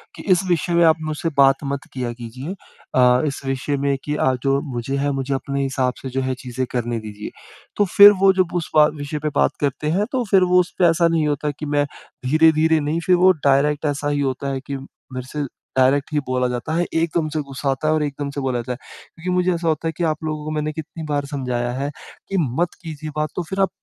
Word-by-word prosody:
कि - - -9
इस 180 +1 +4
विषय 175 0 +1
में 170 0 +5
आप 160 -1 +6
मुझसे 155 +1 -2
बात 135 +1 +5
मत 140 0 -2
किया 125 -2 -3
कीजिए। 125 +7 -7 0.4
अ, 125 0 +5
इस 140 - -4
विषय 135 +2 -1
में 140 0 0
कि 150 0 -2
अ, 130 -3 +2
जो 135 0 +2 0.2
मुझे 120 +3 -2
है 145 +1 0
मुझे 135 0 -2
अपने 140 +1 -2
हिसाब 130 -2 0
से 130 - -5
जो 135 +1 -2
है 130 0 -1
चीज़ें 125 +1 -3
करने 120 -2 -1
दीजिए। 105 -1 -7 0.5
तो 205 - +4
फिर 205 0 +11
वो 195 0 +7
जब 185 -2 0
उस 170 - -2
बा 150 -1 +8
विषय 145 +1 -4
पे 150 - +1
बात - - +3
करते 145 +2 -1
हैं 200 +5 +1
तो 255 -2 0
फिर 190 -2 +6
वो 180 0 +4
उसपे 180 0 +1
ऐसा 170 0 +4
नहीं 165 -2 +1
होता 145 0 -1
है 145 - -1
कि 150 - -4
मैं 145 0 +1 0.4
धीरे-धीरे 160 +2 +4
नहीं 150 +3 -1
फिर 180 - +5
वो 185 +1 +6 0.2
डायरेक्ट 145 +2 +2
ऐसा 145 0 -1
ही 145 - 0
होता 135 0 -2
है 135 - -2
कि 140 -1 -3
मेरे 130 -1 -10
से 150 -1 -2 0.3
डायरेक्ट 135 +3 +3
ही 150 - +2
बोला 125 0 +1
जाता 125 +6 -3
है। 175 +1 +1
एकदम 165 -1 +1
से 155 - 0
गुस्सा 140 0 -4
आता 135 +3 -2
है 155 - +3
और 155 - +1
एकदम 145 0 -3
से 140 - -4
बोला 130 -2 -1
जाता 125 - -6
है। - - -8 0.4
क्योंकि 175 +2 -5
मुझे 180 0 +2
ऐसा 170 0 -3
होता 160 +1 0
है - - 0
कि 175 - -1
आप 155 0 -1
लोगों 155 -1 -3
को 155 - -3
मैंने 155 0 -1
कितनी 160 +1 -7
बार 145 -1 0
समझाया 125 -4 -2
है 140 +2 -3 0.4
कि, 195 - -1
मत 160 +5 0
कीजिए 155 -2 -7
बात 150 0 0
तो 180 - -2
फिर 195 0 -3
आप 195 - +3
145 Hz, 245 wpm, -21 LUFS, 135-160 Hz, 0.5 s, फिर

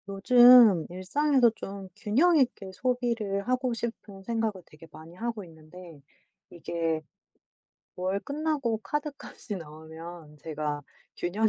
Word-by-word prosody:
요즘 235 -2 +7
일상에서 245 - +2
좀 195 -2 -8
균형 305 +12 +3
있게 240 -8 0
소비를 230 -4 -1
하고 255 0 0
싶은 225 -4 -7
생각을 220 -3 -2
되게 155 +2 -16
많이 160 +2 -13
하고 230 0 -4
있는데 165 -1 -14 0.5
이게 165 -2 -3 1.0
월 185 +2 -1
끝나고 280 -2 -2
카드값이 285 -5 -5
나오면 160 0 -11
제가 150 -1 -4 0.4
균형 205 +6 0
200 Hz, 245 characters per minute, -28 LUFS, 170-245 Hz, 1.0 s, 요즘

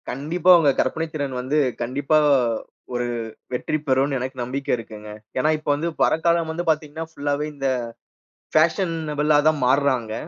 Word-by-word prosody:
கண்டிப்பா. 155 +7 -1
அவங்க 150 -4 +4
கற்பனைத்திறன் 145 -2 -3
வந்து, 135 +4 -1 0.3
கண்டிப்பா. 140 +5 +1 0.8
ஒரு 120 0 -1 0.5
வெற்றி 140 +5 -1
பெறுன்னு 135 +1 +2
எனக்கு 130 +2 -5
நம்பிக்க 135 +3 -5
இருக்குங்க. 105 -2 -10 0.3
ஏன்னா, 150 - +2
இப்ப 155 - -6
வந்து 165 +4 -2
பரக்காலம் 170 0 +2
வந்து 170 +2 -3
பாத்தீங்கன்னா 155 +1 -1
ஃபுல்லாவே 145 -1 -2
இந்த 135 -1 -2 0.9
ஃபாஷனபுளா 155 -3 +2
தான் 155 -1 +3
மாறுறாங்க. 130 -4 +1
145 Hz, 130 wpm, -22 LUFS, 130-160 Hz, 0.9 s, அவங்க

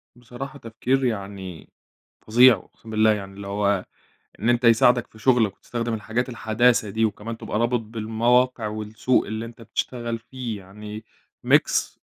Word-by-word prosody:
بصراحة 125 +4 -9
تفكير 125 +3 -1
يعني 95 -6 -5 0.6
فظيع، 120 +3 +7
أقسم 110 +3 -15
بالله 110 0 +4
يعني، 100 -2 -6
اللي 100 0 -8
هو 100 -1 0 0.5
إن 110 +5 +1
أنتَ 120 0 +2
يساعدك 120 +1 +5
في 110 - -18
شغلك 115 -5 +3
وتستخدم 120 -1 -3
الحاجات 115 +3 -2
الحداثة 120 -1 +2
دي، 110 +3 +1
وكمان 110 +1 -4
تبقى 105 - -3
رابط 120 +1 +2
بالمواقع 115 +2 +1
والسوق 110 +4 0
اللي 110 +2 -4
أنتَ 115 0 -12
بتشتغل 115 +1 -3
فيه، 120 -2 -6
يعني 105 +3 -9 0.4
Mix - - +3
115 Hz, 145 wpm, -24 LUFS, 105-120 Hz, 0.6 s, فظيع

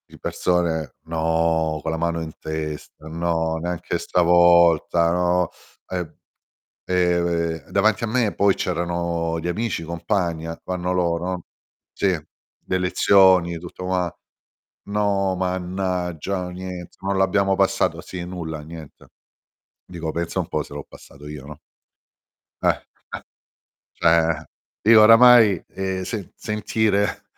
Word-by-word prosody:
Di - - -15
persone: 85 -3 -1
"No," 80 -1 0
con 80 - -3
la 80 - -2
mano 85 0 -1
in 80 -1 -6
testa: 75 0 -6
"No, 80 0 -1
neanche 90 0 -3
stavolta, 85 -1 +4
no." 90 0 +1 0.4
E, 90 -3 -5 0.7
ehm, 85 -3 0
davanti 105 +2 +2
a - - +1
me 115 -1 0
poi 100 -1 +3
c'erano 85 -1 -2
gli 85 - -4
amici, 110 +1 -2
i - - -6
compagni, 85 -1 -2
ac 80 0 -7
vanno 90 0 -2
loro 90 0 -1 0.5
sì, 100 - 0 0.6
le 95 - 0
lezioni, 90 -1 +4
tutto 90 +2 -9
qua 90 -2 -1 0.7
"No 100 -2 0
mannaggia, 90 -1 -2
niente, 90 -1 -8
non 100 0 -1
l'abbiamo 95 +1 +2
passato" 95 0 +1
sì, 90 -2 -7
nulla 85 -4 -6
niente. 80 -1 -12 0.8
Dico: 85 -3 -5
"Pensa 85 +2 -3
un 90 - -2
po' 75 - -1
se 70 - -12
l'ho 75 - -6
passato 70 +1 -15
io," 75 -2 -8
no? 75 0 -10 1.1
Eh, - - +4 0.4
eh, - - -8 0.7
cioè, 85 -1 +2 0.4
io 110 0 +8
oramai, 115 -4 +7
e 95 -1 -3
se 105 -6 -5
sentire 105 -1 -1
90 Hz, 125 wpm, -22 LUFS, 80-95 Hz, 1.1 s, io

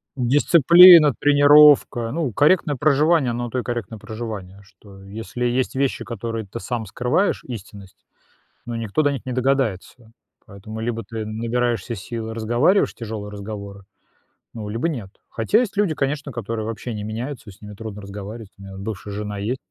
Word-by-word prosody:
дисциплина, 155 +5 +7
тренировка. 145 -4 +5
Ну, 155 -4 -2
корректное 150 - +2
проживание- 150 0 +2
оно 120 +1 -3
на - - -6
то 125 - -2
и - - -4
корректное 120 -3 -5
проживание, 105 -4 -7
что, 100 0 -17
если 115 +4 -5
есть 125 +2 -1
вещи, 135 0 -1
которые 115 -1 -5
ты 110 +4 -8
сам 120 -3 -4
скрываешь, 125 - 0
истинность, 100 -5 -10 0.6
но 120 - -5
никто 115 +5 -1
до 145 -1 +2
них 135 - -6
не 130 - -3
догадается. 125 -3 -2 0.4
Поэтому 110 +2 -9
либо 115 0 -3
ты 110 -1 -5
набираешься 115 0 -2
сил 110 +2 -6
и 110 - -6
разговариваешь 120 - +2
тяжёлые 110 -3 -7
разговоры, 100 -1 -8 0.7
ну, 110 -3 -7
либо 115 +10 -1
нет. 115 - -6 0.2
Хотя 120 - +1
есть 235 -5 -2
люди, 195 -7 +1
конечно, 140 +1 -2
которые 115 -2 -4
вообще 115 +2 -5
не 105 -1 -5
меняются, 115 +3 -6
и - - -11
с 100 - -24
ними 105 0 -10
трудно 105 -1 -8
разговаривать. 100 +2 -9
У 100 - -16
меня 95 0 -10
вот 95 - -8
бывшая 100 0 -6
жена 105 0 -5
есть. 110 +6 -2
115 Hz, 175 wpm, -21 LUFS, 105-135 Hz, 0.7 s, дисциплина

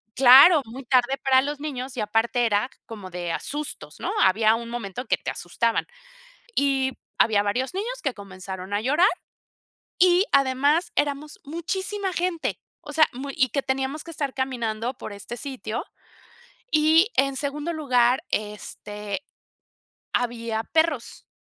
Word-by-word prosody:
claro, 270 +6 +9
muy 250 +4 -9
tarde 255 +1 +3
para 260 -1 +5
los 290 +1 -4
niños, 265 -3 -5
y - - 0
aparte 225 +3 +1
era 210 +2 +1 0.2
como 205 -5 -9
de, 175 -1 -4
ah, - - -1
sustos, 295 +1 -6
¿no? - - -2
Había 215 +3 +4
un 230 0 -6
momento 240 0 -5
que - - +1
te - - -5
asustaban. 225 +6 -1 0.7
Y 270 -3 +1 0.3
había 210 -2 +4
varios 245 - -1
niños 475 +6 -3
que 275 -5 -1
comenzaron 190 -1 -8
a 205 - +1
llorar, 295 - +4 0.9
y 360 +2 +5
además 280 +5 +3
éramos 290 +1 -2
muchísima 380 +6 -3
gente, 350 -1 -2 0.2
o - - -9
sea 315 -1 +5
muy 275 +3 -6
y 260 - +3
que 275 - -1
teníamos 265 +3 -2
que 335 - -9
estar 285 -4 -3
caminando 240 -3 -2
por 230 - -8
este 205 +4 -7
sitio, 255 -4 -5 0.9
y 315 +4 +5
en 275 0 +2
segundo 295 +4 -2
lugar, 255 -4 +2
este, 210 +2 -4 0.9
había 230 -2 -1
perros, 320 -3 -1
260 Hz, 145 wpm, -24 LUFS, 225-295 Hz, 0.9 s, claro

